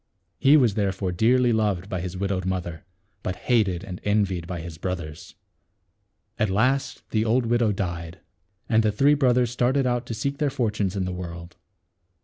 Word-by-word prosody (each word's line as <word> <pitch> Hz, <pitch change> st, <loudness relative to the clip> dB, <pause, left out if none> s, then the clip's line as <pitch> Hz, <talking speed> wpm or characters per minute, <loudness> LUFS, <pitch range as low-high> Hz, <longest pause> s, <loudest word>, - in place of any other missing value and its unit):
He 140 Hz, +3 st, +6 dB
was 120 Hz, -7 st, +3 dB
therefore 95 Hz, -2 st, -1 dB
dearly 120 Hz, +6 st, +3 dB
loved 105 Hz, -4 st, 0 dB
by 95 Hz, -3 st, -3 dB
his 90 Hz, 0 st, -5 dB
widowed 95 Hz, -1 st, -1 dB
mother, 90 Hz, -3 st, -4 dB, 0.4 s
but 95 Hz, -, -3 dB
hated 100 Hz, -6 st, +1 dB
and 90 Hz, -2 st, -8 dB
envied 100 Hz, -5 st, 0 dB
by 90 Hz, -1 st, -4 dB
his 80 Hz, -1 st, -8 dB
brothers. 85 Hz, -5 st, -5 dB, 1.0 s
At 105 Hz, -, +2 dB
last 130 Hz, +8 st, 0 dB
the 110 Hz, -1 st, +2 dB
old 115 Hz, +2 st, +2 dB
widow 115 Hz, -1 st, +2 dB
died; 85 Hz, -4 st, -4 dB, 0.5 s
and 110 Hz, -1 st, +3 dB
the 110 Hz, -1 st, +2 dB
three 140 Hz, +8 st, +4 dB
brothers 125 Hz, -4 st, +2 dB
started 125 Hz, +2 st, +1 dB
out 120 Hz, -1 st, -1 dB
to 115 Hz, -, -4 dB
seek 140 Hz, +5 st, -3 dB
their 150 Hz, -2 st, +2 dB
fortunes 105 Hz, -7 st, -1 dB
in 95 Hz, -2 st, -1 dB
the 90 Hz, -, -3 dB
world. 85 Hz, -1 st, -7 dB
105 Hz, 170 wpm, -25 LUFS, 90-120 Hz, 1.0 s, He